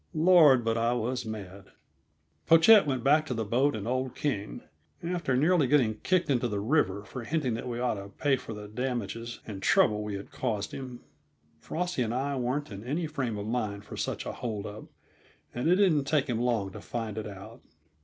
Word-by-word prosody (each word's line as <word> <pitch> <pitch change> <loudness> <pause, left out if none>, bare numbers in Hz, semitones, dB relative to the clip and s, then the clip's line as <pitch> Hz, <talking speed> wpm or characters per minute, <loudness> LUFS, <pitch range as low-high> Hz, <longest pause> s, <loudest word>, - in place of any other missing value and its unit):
Lord, 155 -7 +6
but 115 0 +1
I 115 +1 +2
was 120 0 -2
mad! 100 -3 -7 0.8
Pochette 165 +3 +7
went 130 -4 -1
back 150 +3 +4
to 125 - -2
the 110 -1 -2
boat 130 +7 +2
and 105 0 -5
old 130 0 -2
King, 100 - -3 0.4
after 170 -7 -1
nearly 155 0 +3
getting 120 -6 +2
kicked 185 -1 +1
into 125 -3 +1
the 105 -3 -2
river 100 -4 +1
for 125 +2 -7
hinting 140 -2 -1
that 115 - -4
we 120 -1 -4
ought 120 -5 -1
to 100 - -10
pay 140 +7 +1
for 115 -3 -7
the 105 0 -8
damage 120 0 -4
and 100 -3 -7
trouble 105 +1 +3
we 105 -1 -4
had 100 - -8
caused 105 -6 -2
him. 130 -3 -7 0.6
Frosty 175 - -3
and 115 0 -1
I 140 +2 -1
weren't 130 +3 -2
in 100 +1 -7
any 150 +8 -2
frame 135 -8 -3
of 100 - -5
mind 105 -3 -3
for - - -9
such - - -3
a - - -3
hold 110 -5 -4
up, 105 +1 -8 0.7
and 125 +7 -1
it 180 - +6
didn't 175 -8 +3
take 140 -1 +2
him 120 -3 -1
long 115 -6 0
to - - -9
find 115 -3 -4
it 110 -1 -4
out. 95 -2 -10
120 Hz, 205 wpm, -29 LUFS, 110-145 Hz, 0.8 s, Pochette